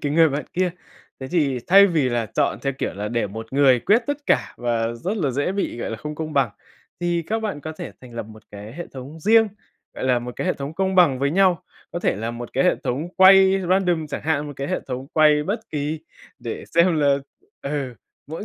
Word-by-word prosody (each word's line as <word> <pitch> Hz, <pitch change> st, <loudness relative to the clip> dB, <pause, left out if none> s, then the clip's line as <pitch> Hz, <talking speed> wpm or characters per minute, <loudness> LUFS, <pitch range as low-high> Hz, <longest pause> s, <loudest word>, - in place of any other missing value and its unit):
cái 145 Hz, -1 st, -2 dB
người 165 Hz, 0 st, +5 dB
bạn 145 Hz, +1 st, -3 dB
kia. 180 Hz, 0 st, +1 dB, 0.5 s
Thế 130 Hz, -, -6 dB
thì 145 Hz, -7 st, +1 dB
thay 200 Hz, +2 st, +8 dB
vì 155 Hz, -8 st, +1 dB
là 120 Hz, -2 st, -1 dB
chọn 110 Hz, -, 0 dB
theo, 135 Hz, -, 0 dB
kiểu -, -, -2 dB
là, 105 Hz, +1 st, -4 dB
để 115 Hz, -2 st, -1 dB
một 110 Hz, +4 st, -8 dB
người 135 Hz, -3 st, +4 dB
quyết 220 Hz, -, +3 dB
tất 285 Hz, -1 st, -1 dB
cả 100 Hz, -2 st, +1 dB
và 115 Hz, -1 st, -1 dB
rất 185 Hz, -, -3 dB
là 150 Hz, -9 st, 0 dB
dễ 145 Hz, +8 st, -1 dB
bị, 195 Hz, -11 st, -2 dB
gọi -, -, -4 dB
là, 115 Hz, -, -4 dB
không 150 Hz, +5 st, -6 dB
công 155 Hz, 0 st, -5 dB
bằng, 135 Hz, -6 st, +2 dB, 0.5 s
thì 175 Hz, -1 st, 0 dB
các 225 Hz, +1 st, 0 dB
bạn 205 Hz, -9 st, -3 dB
có 160 Hz, -, -6 dB
thể 155 Hz, -, -8 dB
thành 125 Hz, -2 st, -13 dB
lập 115 Hz, -, -3 dB
một 110 Hz, 0 st, -14 dB
cái 105 Hz, +2 st, -9 dB
hệ 175 Hz, -, -6 dB
thống 140 Hz, +5 st, -9 dB
riêng, 225 Hz, +3 st, +5 dB, 0.5 s
gọi -, -, -5 dB
là, 125 Hz, -1 st, +3 dB
một 120 Hz, 0 st, -8 dB
cái -, -, -3 dB
hệ 180 Hz, -, +2 dB
thống 140 Hz, +3 st, -6 dB
công 190 Hz, 0 st, 0 dB
bằng 165 Hz, -8 st, +5 dB
với 140 Hz, +1 st, +1 dB
nhau, 185 Hz, 0 st, +3 dB, 0.3 s
có 175 Hz, -, -2 dB
thể 175 Hz, -, 0 dB
là 115 Hz, +2 st, -3 dB
một 120 Hz, 0 st, -8 dB
cái 135 Hz, -, +1 dB
hệ -, -, +3 dB
thống 145 Hz, +8 st, -2 dB
quay 190 Hz, 0 st, +7 dB
random 180 Hz, -4 st, +2 dB
chẳng -, -, -5 dB
hạn, 150 Hz, -1 st, 0 dB
một 145 Hz, -, -6 dB
cái 140 Hz, +1 st, -4 dB
hệ -, -, -1 dB
thống 130 Hz, +1 st, -4 dB
quay 150 Hz, -1 st, +4 dB
bất 205 Hz, +7 st, -2 dB
kỳ 150 Hz, +1 st, -3 dB, 0.4 s
để 115 Hz, -, -6 dB
xem 170 Hz, 0 st, +4 dB
là, 140 Hz, -1 st, +4 dB, 0.5 s
ừ, 140 Hz, -3 st, -3 dB, 0.3 s
mỗi 160 Hz, +7 st, -6 dB
150 Hz, 240 wpm, -22 LUFS, 125-175 Hz, 0.5 s, thay